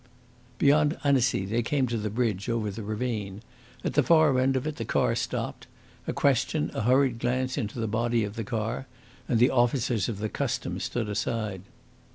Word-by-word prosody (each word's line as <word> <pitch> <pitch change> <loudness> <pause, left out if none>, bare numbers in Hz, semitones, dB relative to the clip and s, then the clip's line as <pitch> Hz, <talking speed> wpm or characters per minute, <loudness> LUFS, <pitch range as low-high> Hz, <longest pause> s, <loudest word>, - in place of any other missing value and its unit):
Beyond 150 +2 +3
Annecy, 130 -8 +2
they 115 +5 0
came 135 +2 +1
to 120 -1 -2
the 105 0 -2
bridge 110 -1 -1
over 115 -3 -1
the 105 +3 -7
ravine. 110 -2 -3 0.4
At - - -1
the 150 - +4
far 155 -3 +4
end 135 +1 +2
of 130 - -1
it, 155 -1 -3
the 115 - -3
car - - +1
stopped. - - -3 0.4
A - - 0
question, 75 - +1
a - - -2
hurried 125 +1 +3
glance 130 +2 0
into 110 +2 -3
the 115 - 0
body 115 +1 +1
of 105 0 -5
the 115 - -3
car, 115 +4 -3 0.4
and 120 - +2
the 120 +3 +5
officers 120 -4 +1
of 110 - -3
the 110 +2 -2
Customs - - -3
stood 120 -3 -2
aside. 105 -2 -2
120 Hz, 190 wpm, -27 LUFS, 110-130 Hz, 0.4 s, the